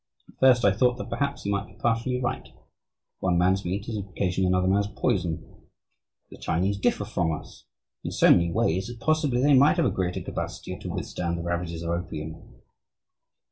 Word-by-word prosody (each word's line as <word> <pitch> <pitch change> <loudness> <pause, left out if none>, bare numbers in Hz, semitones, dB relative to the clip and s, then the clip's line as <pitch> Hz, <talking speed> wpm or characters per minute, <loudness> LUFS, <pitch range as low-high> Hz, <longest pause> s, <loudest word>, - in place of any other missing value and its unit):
At - - -21
first 125 -3 +5
I 100 - +6
thought 125 +5 +2
that - - -7
perhaps 140 0 -2
he 100 - -1
might 100 +1 -1
be - - -18
partially 120 +2 0
right. 125 -1 -3 0.7
One 90 -2 +1
man's 95 +3 +2
meat 100 +4 -3
is 115 -2 -3
occasionally 95 -1 -1
another 90 0 +2
man's 100 +1 +2
poison. 90 -7 -2 0.7
The - - -11
Chinese 95 +4 0
differ - - +1
from 85 -2 0
us 75 - -8 0.4
in - - -3
so - - +4
many 85 -1 +4
ways 90 +3 +1
that 120 -1 -8
possibly 145 -2 +1
they 145 0 +5
might 140 +5 +6
have 170 - +3
a - - +2
greater 90 -1 -2
capacity - - -5
to - - -7
withstand 85 -1 -3
the 85 - -4
ravages 85 -1 -3
of 85 - -2
opium. 80 -2 -6
95 Hz, 185 wpm, -26 LUFS, 85-120 Hz, 0.7 s, I